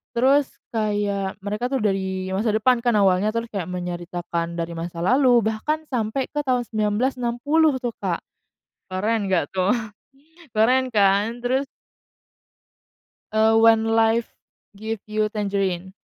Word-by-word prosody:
terus 270 +3 +4 0.2
kayak 205 -3 -1
mereka 210 +4 -2
tuh 265 -4 -2
dari 190 -2 -1
masa 210 +3 0
depan 245 +2 +3
kan, 240 -2 +1
awalnya 195 0 +3
terus 230 0 -3
kayak 190 -5 -3
menyeritakan 175 -1 -4
dari 170 0 -3
masa 170 0 -5
lalu, 245 +1 +4
bahkan 260 +9 -1
sampai 240 +2 -2
ke 295 - -2
tahun 250 -3 0
1960 245 +7 +1
tuh, 240 - -1
Kak. - - -2 0.7
Keren 205 +1 -1
nggak 175 -5 +2
tuh, 185 +2 +1 0.8
keren 255 +4 +3
kan? 205 +2 +2
Terus 260 +3 0 1.7
Eee, 220 +1 +4
When 225 -1 +5
Life 225 +1 +2 0.4
Gives 220 0 -5
You 215 0 0
Tangerines. 195 -3 -2
215 Hz, 125 wpm, -23 LUFS, 190-240 Hz, 1.7 s, When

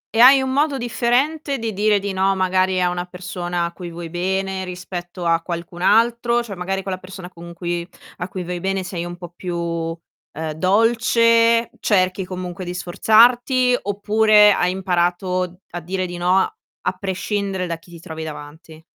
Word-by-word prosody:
E - - +1
hai 265 +2 +8
un 260 0 -2
modo 285 0 +1
differente 265 +5 0
di 225 -1 -3
dire 205 +1 +2
di 200 0 -4
no, 190 +1 +1
magari 185 0 +2
a 180 - +3
una 175 0 -2
persona 180 -1 -4
a 170 - -5
cui 175 -1 -8
vuoi 170 0 -7
bene, 190 +2 -2
rispetto 180 -1 -7
a 165 0 +2
qualcun 170 0 -6
altro? 235 +4 +3
Cioè, 220 -4 -7
magari 190 +2 -3
quella 190 -1 -3
persona 185 0 -10
con 170 -1 -11
cui 175 0 -3 0.3
a 180 - -4
cui 185 -1 -5
vuoi 175 0 -4
bene 195 +1 -1
sei 180 -2 -4
un 175 0 -7
po' 175 -1 -10
più, 175 -1 -4 0.7
ehm, 160 +1 -4
dolce, 230 +5 +3
cerchi 185 -2 +2
comunque 180 0 -6
di 175 0 -5
sforzarti, 240 +7 +4
oppure 210 +1 +4
hai 180 -1 +1
imparato 180 -1 -1
a 175 - -5
dire 185 +3 -2
di 175 -1 -6
no, 175 +1 +1
a 435 - -2
prescindere 195 -1 -2
da 170 - -2
chi 165 +1 -20
ti 170 - -11
trovi 160 -2 -7
davanti? 155 +1 -10
185 Hz, 175 wpm, -21 LUFS, 175-215 Hz, 0.7 s, hai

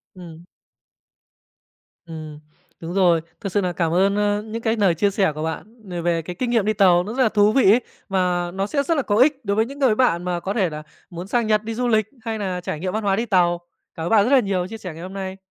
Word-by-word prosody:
Ừm. 170 -2 -12 1.6
Ừm. 155 -2 -9 0.4
Đúng 165 +1 -6
rồi, 175 -4 +3 0.2
thật 200 - -3
sự 205 - +1
nà 180 -2 -1
cảm 165 -2 -1
ơn, 195 +3 +3
ơ, 205 0 +1
những 220 +2 -6
cái 225 0 0
lời 195 -6 +2
chia 200 +5 +2
sẻ 195 -4 +1
của 155 - -4
bạn 210 +7 -7
về 175 -1 -4
về 170 -1 0
cái 175 +2 -7
kinh 250 - -1
nghiệm 230 -4 +2
đi 215 - +1
tàu 180 -4 +4
nó 210 +4 -6
rất 260 +1 +2
là 225 - +3
thú 210 -1 +3
vị 230 -4 +5
ấy, 235 +4 +4 0.3
và 180 -2 0
nó 195 +1 -2
sẽ 280 +5 0
rất 330 +4 0
là - - +2
có 205 - 0
ích 265 +1 +3
đối 200 0 0
với 220 +1 +2
những 275 +4 -10
cái 255 -6 +3
bạn 215 -9 +2
mà 180 -1 -2
có 190 +3 -3
thể 195 -6 +1
là 155 -1 -7 0.3
muốn 175 +1 -7
sang 235 +1 0
Nhật 215 -1 +2
đi 225 +1 -4
du 245 +2 -1
lịch 220 -2 +2 0.2
hay 225 -2 -4
nà 185 -3 -3
trải 155 - -4
nghiệm 185 +2 -3
văn 220 +1 -2
hóa 195 -1 +2
đi 225 +4 -1
tàu. 175 -5 +2 0.4
Cảm 160 - -5
ơn - - -2
bạn 215 -3 +5
rất 250 - 0
là 275 - +7
nhiều 195 -5 -1
chia 225 +3 -8
sẻ 185 -6 -7
ngày 165 - -10
hôm 185 +1 -8
nay. 190 -1 -5
195 Hz, 275 wpm, -22 LUFS, 175-220 Hz, 1.6 s, là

